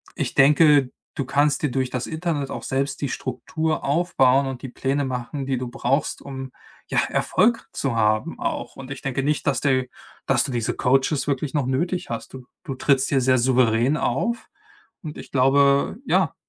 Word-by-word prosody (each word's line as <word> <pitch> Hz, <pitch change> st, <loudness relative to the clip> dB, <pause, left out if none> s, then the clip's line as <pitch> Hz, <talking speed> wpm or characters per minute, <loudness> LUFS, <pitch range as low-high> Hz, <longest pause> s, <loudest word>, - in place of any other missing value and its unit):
ich -, -, -3 dB
denke, 145 Hz, -1 st, +5 dB, 0.2 s
du 135 Hz, -, -2 dB
kannst 145 Hz, +2 st, +1 dB
dir 145 Hz, -, +1 dB
durch 130 Hz, -1 st, -1 dB
das 125 Hz, -1 st, -3 dB
Internet 160 Hz, -4 st, -2 dB
auch -, -, -5 dB
selbst 135 Hz, +1 st, -2 dB
die 140 Hz, -, -1 dB
Struktur 150 Hz, +6 st, -3 dB
aufbauen 140 Hz, -4 st, +3 dB
und 130 Hz, -2 st, -5 dB
die 130 Hz, -, -6 dB
Pläne 135 Hz, +3 st, -1 dB
machen, 130 Hz, +2 st, -4 dB
die 130 Hz, -2 st, 0 dB
du 125 Hz, -1 st, -4 dB
brauchst, 135 Hz, +2 st, -1 dB
um, 135 Hz, -1 st, -7 dB, 0.4 s
ja, -, -, +1 dB
Erfolg 230 Hz, +5 st, +1 dB
zu 135 Hz, -4 st, -2 dB
haben 110 Hz, +7 st, +1 dB
auch 330 Hz, -4 st, -3 dB
und 135 Hz, 0 st, -9 dB
ich 135 Hz, -, -6 dB
denke 135 Hz, 0 st, -2 dB
nicht, 150 Hz, +1 st, -1 dB
dass 135 Hz, -3 st, +1 dB
der 130 Hz, -3 st, +2 dB, 0.4 s
dass -, -, +2 dB
du 140 Hz, -, -4 dB
diese 120 Hz, -3 st, -1 dB
Coaches 135 Hz, +2 st, +1 dB
wirklich 140 Hz, 0 st, -1 dB
noch 145 Hz, -4 st, 0 dB
nötig 170 Hz, +8 st, -1 dB
hast. 115 Hz, +2 st, -6 dB
Du 130 Hz, -2 st, -10 dB, 0.2 s
du 135 Hz, -, -5 dB
trittst 135 Hz, 0 st, +2 dB
hier 135 Hz, -2 st, +2 dB
sehr 130 Hz, 0 st, +3 dB
souverän 125 Hz, +1 st, +3 dB
auf 225 Hz, -, -1 dB, 0.5 s
und 150 Hz, -2 st, -7 dB
ich -, -, -11 dB
glaube, 140 Hz, +1 st, +3 dB
ja, -, -, +2 dB
135 Hz, 185 wpm, -23 LUFS, 130-145 Hz, 0.5 s, denke